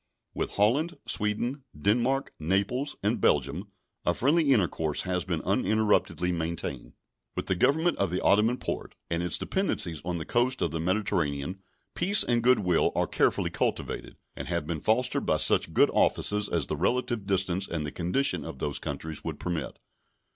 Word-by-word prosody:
With - - -3
Holland, 140 - +2
Sweden, 120 +6 -1 0.2
Denmark, 120 - +1
Naples, 100 - -1
and 105 +1 0
Belgium 75 +8 +1 0.4
a 85 - +1
friendly 145 +3 +3
intercourse 80 - +1
has 90 -3 -2
been - - -2
uninterruptedly 105 -4 +1
maintained. 85 0 -4 0.4
With - - -3
the - - +1
Government 160 - +2
of 100 - +1
the 90 +2 -1
Ottoman 110 +5 +3
Porte - - -5 0.2
and 85 0 0
its 90 - +2
dependencies 90 - -1
on 90 0 -2
the 80 - -5
coast 125 +2 +1
of 80 - -1
the 80 - -3
Mediterranean 90 -3 -1 0.3
peace 200 +5 +4
and 120 -1 +1
good 125 +2 +5
will 90 -3 +2
are - - +2
carefully - - +1
cultivated, - - -2 0.2
and 70 - -6
have 85 -2 -2
been 80 -1 -4
fostered 125 +4 +1
by - - +3
such - - +4
good - - +4
offices 105 -1 +1
as 85 -4 0
the - - -3
relative 110 - -1
distance 95 -1 0
and 80 -3 -3
the 75 - -4
condition 90 +11 0
of - - -7
those 70 - -3
countries 80 -2 -5
would - - -5
permit. 85 -7 -4
95 Hz, 170 wpm, -28 LUFS, 85-120 Hz, 0.4 s, good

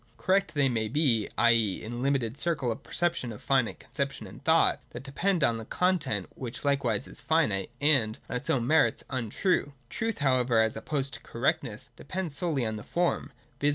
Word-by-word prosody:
Correct 185 +6 +1
they 145 -2 +3
may 115 -4 0
be, 120 -4 +2
i.e. 115 -4 +4
in 110 - -7
the 120 - -5
limited 130 -2 0
circle 145 -6 0
of 115 - -5
perception, 170 -8 -1
of 105 - -8
finite 130 -4 +1
conception - - -4
and - - -12
thought: - - +4
that - - -8
depends 170 +5 0
on 115 -3 +3
the 110 - -7
content, 150 - 0
which 125 +2 -7
likewise 140 -7 +1
is - - -10
finite, 110 - +1
and, 135 -7 +3
on - - -4
its 125 - -7
own 120 -3 +2
merits, 155 +4 +3
untrue. 135 - 0 0.2
Truth, 225 -1 -2
however, 130 -5 +2
as 110 0 +2
opposed 140 -3 -3
to 115 - -5
correctness, 130 -1 -2
depends 180 -2 -4
solely 145 -5 0
on 110 -1 -2
the 105 - -8
form, 175 0 -1 0.3
viz. 145 - +3
135 Hz, 190 wpm, -28 LUFS, 115-155 Hz, 0.3 s, i.e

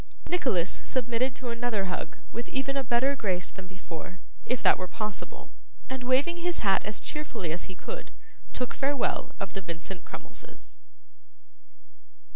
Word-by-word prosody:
Nicholas 255 - +2
submitted 245 0 +2
to 250 -1 -3
another 235 -4 +1
hug 180 -1 -2 0.2
with 235 +1 -3
even 270 +1 +1
a 275 - +2
better 255 +3 +4
grace 185 -8 0
than 190 -1 -8
before, 185 -1 -7 0.3
if 250 - +2
that - - +7
were 185 - -1
possible, 215 +1 -4 0.4
and 260 -1 -2
waving 270 +7 +4
his 345 -7 0
hat 195 -1 +6
as 210 - -1
cheerfully 235 - -2
as 170 - -1
he 185 - -7
could, 485 - -5 0.4
took 250 -1 -1
farewell 275 -1 +1
of 195 -1 -3
the 195 - -2
Vincent 170 +1 -5
Crummleses. - - -10
235 Hz, 150 wpm, -30 LUFS, 190-265 Hz, 0.4 s, that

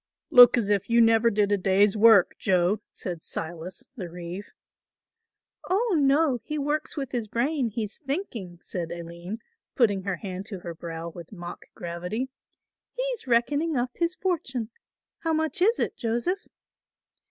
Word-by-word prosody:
"Look 245 0 +9
as 210 -3 +1
if 200 +1 +1
you 235 0 +4
never 225 0 +5
did 205 -2 +1
a 205 - +3
day's 195 +2 +3
work, 220 -3 +6
Joe," 190 +1 +2
said 175 -3 -6
Silas, 165 +3 -5
the 185 -8 -6
reeve. 175 +3 -7 1.2
"Oh, 405 +2 +2
no, 280 -2 +3
he 305 +5 -4
works 300 +2 -2
with 275 -3 -3
his 235 -4 -2
brain, 250 +3 0
he's 215 -1 -5
thinking," 270 - -4
said 170 -2 -5
Aline, 170 +4 -6 0.4
putting 210 -8 +3
her 195 0 -2
hand 190 +1 -6
to 195 -5 -7
her 170 -1 -6
brow 165 0 -6
with 170 0 -11
mock 175 -4 -8
gravity. 180 +9 -4 0.7
"He's - - -3
reckoning 285 +6 +2
up 245 +1 0
his 340 +1 -1
fortune. 260 - -2 0.5
How 325 -1 0
much 315 +3 0
is 450 +6 +4
it, - - -1
Joseph?" 240 - -1
225 Hz, 155 wpm, -26 LUFS, 180-280 Hz, 1.2 s, Look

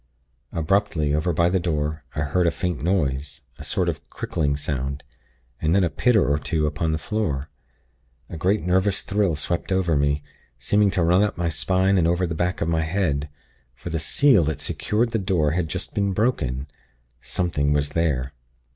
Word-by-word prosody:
"Abruptly, 80 -3 +1
over 75 +4 +1
by 85 +1 +2
the 95 +2 +2
door, 75 -3 -2
I - - -1
heard 85 +4 +1
a - - +5
faint 90 +1 -3
noise 75 -6 -1 0.2
a - - -7
sort 90 - -1
of 75 -6 -4
crickling 70 -3 -1
sound, 70 -1 -3 0.6
and 80 +3 +2
then 100 - +4
a 85 - +1
pitter 120 -5 +3
or 75 +1 +2
two 75 0 -1
upon 75 +2 -1
the 80 - 0
floor. 80 -6 -2 0.8
A - - -8
great 95 +6 +1
nervous 95 +2 +1
thrill 100 -5 +1
swept 85 +5 -2
over 95 -4 +2
me, 70 0 +1 0.3
seeming 100 +11 +2
to 90 -2 0
run 90 +3 +4
up 105 -3 0
my 85 -1 0
spine 95 +4 +2
and 80 - +3
over 90 +2 +1
the 85 - -3
back 90 +3 -1
of 80 - +1
my 80 -1 +1
head; 80 -4 -1 0.5
for 85 - -7
the 80 - -1
seal 125 - +4
that 75 -2 -2
secured 115 +2 0
the 115 - 0
door 90 -6 +1
had 85 0 0
just 75 - -5
been 100 -1 0
broken. 70 - 0 0.6
Something 75 -5 -1
was 70 0 +1
there. 70 -5 0
85 Hz, 185 wpm, -23 LUFS, 75-95 Hz, 0.8 s, a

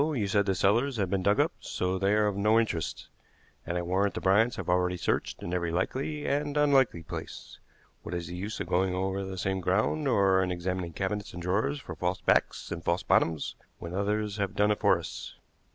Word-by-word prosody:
You 145 -8 0
said 100 0 +2
the 95 - +2
cellars 120 +8 +2
had 95 -4 -1
been 95 - +1
dug 100 +2 +2
up, - - +3
so 90 +1 -2
they 100 +2 +2
are 105 0 +3
of 105 -2 0
no 105 +3 +4
interest, 90 -8 -2 0.6
and 85 +1 -1
I 90 - -1
warrant 95 +3 0
the - - -2
Bryants 105 +5 +3
have - - -6
already 90 0 +1
searched - - -2
in 85 - -4
every 85 -1 0
likely 135 - -2
and 145 +1 -1
unlikely 135 - +3
place. - - -8 0.4
What 90 - -5
is 85 -1 -3
the 85 - -7
use 100 +4 -5
of - - -2
going 90 +1 +1
over 95 +1 -1
the 95 -1 -6
same 95 +1 -1
ground, 110 - +1
or 100 -6 +4
in 90 -1 0
examining 90 -1 -3
cabinets 100 +3 -3
and 90 - -7
drawers 105 +11 0
for 90 - -8
false 90 +3 -2
backs - - +1
and 85 -1 -4
false 85 +2 0
bottoms, 80 -3 +1 0.2
when 85 +1 -7
others 105 +2 -1
have 100 0 -2
done 105 0 +3
it 105 - 0
for - - +4
us?" - - -7
95 Hz, 215 wpm, -29 LUFS, 90-105 Hz, 0.6 s, no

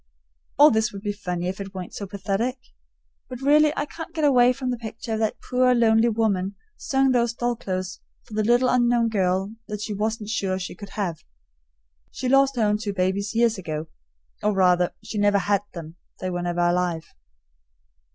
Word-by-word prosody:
All 295 +2 +8
this 220 0 +1
would 200 0 -9
be 205 -1 -1
funny 180 -4 -4
if 190 +2 -4
it 195 0 -8
weren't 185 -2 -6
so 200 - -6
pathetic; 200 +6 -2 0.7
but 250 -2 -7
really 295 +2 +4
I 290 - 0
can't 325 +2 -9
get 315 - -1
away 250 -4 +5
from 255 0 -3
the 245 - -2
picture 225 0 -6
of 220 - -1
that 220 -1 -1
poor 250 0 +3
lonely 230 0 +4
woman 200 -4 0 0.2
sewing 270 -1 +1
those 235 -2 +2
doll 240 0 -1
clothes 185 -3 -4 0.2
for - - -15
the 215 - +1
little 240 +3 +3
unknown 240 -2 +3
girl 190 -1 0
that 210 -1 -5
she 215 0 -3
wasn't 215 +1 -2
sure 195 -4 -1
she 180 -1 -5
could 200 +2 -10
have. 180 -6 -3 0.9
She 255 - -4
lost 275 +1 +4
her 235 - +1
own 210 0 +2
two 205 -2 -3
babies 195 +3 -1
years 230 -3 +2
ago, 155 -3 -5 0.5
or, 210 - +1
rather, 180 -2 +3
she 215 - -4
never 205 0 +4
had 200 0 +1
them; 165 -1 -9 0.2
they 185 -1 -3
were 175 0 -2
never 175 0 -1
alive. 175 -1 +1
210 Hz, 190 wpm, -24 LUFS, 185-240 Hz, 0.9 s, All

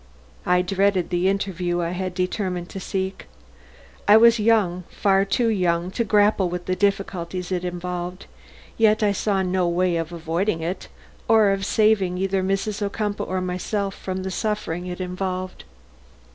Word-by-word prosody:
I 180 0 +3
dreaded 190 -1 +1
the 180 +2 +2
interview 185 -3 -1
I 170 0 -2
had 185 0 -4
determined 180 -1 -2
to 195 - -6
seek. 190 +1 -4 0.8
I 205 +1 +8
was 235 0 +6
young, 210 -5 +2
far 195 -1 +2
too 230 +4 +1
young, 180 -4 0
to 235 - 0
grapple 205 -3 +3
with 175 0 -5
the 185 - 0
difficulties 185 -2 -1
it 180 -1 -1
involved; 180 +1 -4 0.5
yet 215 -1 +4
I 205 - +3
saw 200 -1 0
no 185 -1 +1
way 175 0 +1
of 165 0 -3
avoiding 170 +2 -1
it, 175 +4 -4 0.4
or 220 -3 +5
of 195 0 -1
saving 210 -4 +2
either 195 0 0
Mrs. 195 +2 -1
Ocumpaugh 205 0 -2
or 185 0 -1
myself 190 +2 -2
from 185 -1 -5
the 190 - -3
suffering 185 -4 -2
it 180 0 -5
involved. 185 - -4
185 Hz, 160 wpm, -23 LUFS, 180-200 Hz, 0.8 s, I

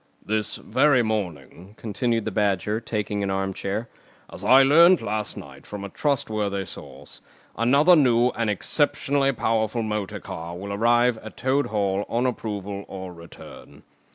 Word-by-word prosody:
"This 110 0 -2
very 130 +1 +2
morning," 95 - -5
continued 115 +1 -1
the 110 - -2
Badger, 105 +1 0
taking 105 -3 -3
an 100 - -1
arm 95 0 -1
chair, 100 +5 -4 0.5
"as 95 - -8
I 130 +6 +7
learnt 170 +6 +6
last 105 0 -3
night 70 -1 -11
from 105 -1 -7
a 100 - -6
trustworthy 105 -8 -1
source, - - -11 0.3
another 140 +10 +5
new 125 -5 +4
and 115 -3 -2
exceptionally 140 - +1
powerful 115 -1 -1
motor 105 -2 -3
car 85 +1 -7
will 100 +2 -6
arrive 120 +2 +2
at 110 - -11
Toad 135 +3 +1
Hall 100 -2 -1
on 120 +2 0
approval 100 -5 -4
or 95 -2 -8
return. 85 0 -13
110 Hz, 150 wpm, -24 LUFS, 100-120 Hz, 0.5 s, I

